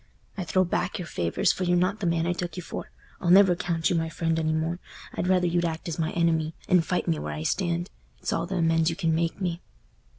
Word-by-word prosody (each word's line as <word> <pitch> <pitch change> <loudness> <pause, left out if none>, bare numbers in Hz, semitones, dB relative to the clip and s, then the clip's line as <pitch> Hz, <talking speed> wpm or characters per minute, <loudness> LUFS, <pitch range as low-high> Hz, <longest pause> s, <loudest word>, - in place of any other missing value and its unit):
I 190 -3 -4
throw 185 +3 +3
back 180 0 -1
your 180 - -5
favours, 85 - +1
for 185 - -3
you're 175 0 +3
not 185 +4 +1
the 190 - -1
man 165 -1 +1
I 175 - +1
took 175 -1 -5
you 180 - -4
for. - - -6 0.3
I'll 175 - -1
never 190 0 +7
count 170 -1 0
you - - +2
my 165 -1 0
friend 165 0 -1
any 160 -1 0
more. 160 +2 -1 0.3
I'd 180 - -2
rather 180 -1 +3
you'd 175 0 +1
act 165 0 -3
as 170 0 -4
my 160 -1 +1
enemy, 165 -2 +1
and 180 -2 +4
fight 180 - -1
me 80 - +1
where 75 0 -4
I 75 +1 -4
stand—it's 175 - -3
all - - -1
th' 195 - -4
amends 165 -2 +2
you 165 - -2
can 165 -3 0
make 165 +2 0
me." 175 -2 -2
170 Hz, 245 wpm, -26 LUFS, 160-180 Hz, 0.3 s, never